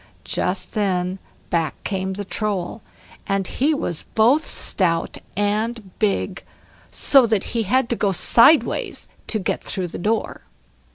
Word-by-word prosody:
Just - - -2
then 185 -3 -1 0.3
back 165 -4 0
came 190 -1 -2
the 200 +1 -5
Troll, 205 0 -3 0.5
and 195 -1 0
he 280 +10 +1
was 175 - -2
both 245 +8 +4
stout 165 -4 0 0.2
and 210 0 -1
big, 210 -3 0 0.5
so 270 -4 +4
that 215 -3 +1
he 230 - +1
had 235 +5 +1
to 235 - +1
go 205 -3 +1
sideways 235 - +4 0.2
to 220 - -1
get 195 - -2
through 185 -2 -3
the - - -7
door. 220 +5 -1
205 Hz, 135 wpm, -22 LUFS, 185-230 Hz, 0.5 s, both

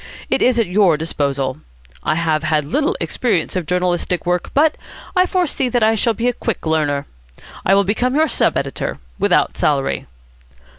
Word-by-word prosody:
It - - +2
is 250 -1 +3
at 230 - +3
your 180 -4 +3
disposal. 140 -4 -2 0.4
I 155 - 0
have 160 -2 0
had 155 -1 0
little 290 - 0
experience 205 -10 -1
of 180 -4 -2
journalistic 180 0 0
work, 180 0 0
but 305 +2 +4 0.4
I 365 0 +4
foresee 335 -9 0
that 240 -1 +1
I 220 +1 +4
shall 225 +1 +1
be 235 +3 -1
a 245 - +2
quick 230 -6 -4
learner. 150 -3 0 0.6
I 195 - +5
will 200 - +4
become 245 +6 0
your 315 +2 +3
sub - - +1
editor, - - -3 0.2
without 200 -2 +2
salary." 140 -2 0
180 Hz, 170 wpm, -19 LUFS, 155-245 Hz, 0.6 s, I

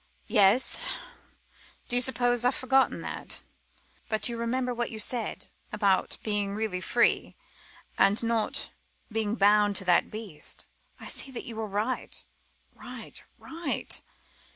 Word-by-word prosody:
"Yes 210 +3 +4 1.1
do 245 - 0
you 245 - +5
suppose 245 -1 +3
I've 250 +2 +3
forgotten 265 +1 +2
that? - - -1 0.7
But 220 -1 +1
you 235 - -3
remember 250 +2 -1
what 240 0 -2
you 220 - -7
said 225 +1 -2 0.2
about 200 -3 +2
being 205 -2 -1
really 210 -4 -2
free, 235 +5 +2 0.6
and 200 +4 +4
not 230 -1 0 0.4
being 220 -1 0
bound 205 -1 +4
to 190 - +1
that 175 -1 +4
beast. 210 -8 -5 0.3
I - - -10
see - - 0
that 255 - -6
you 230 - -7
were 220 0 -3
right 210 +5 -3 0.5
right, - - -9 0.2
right. 325 -2 -3
225 Hz, 130 wpm, -28 LUFS, 205-245 Hz, 1.1 s, you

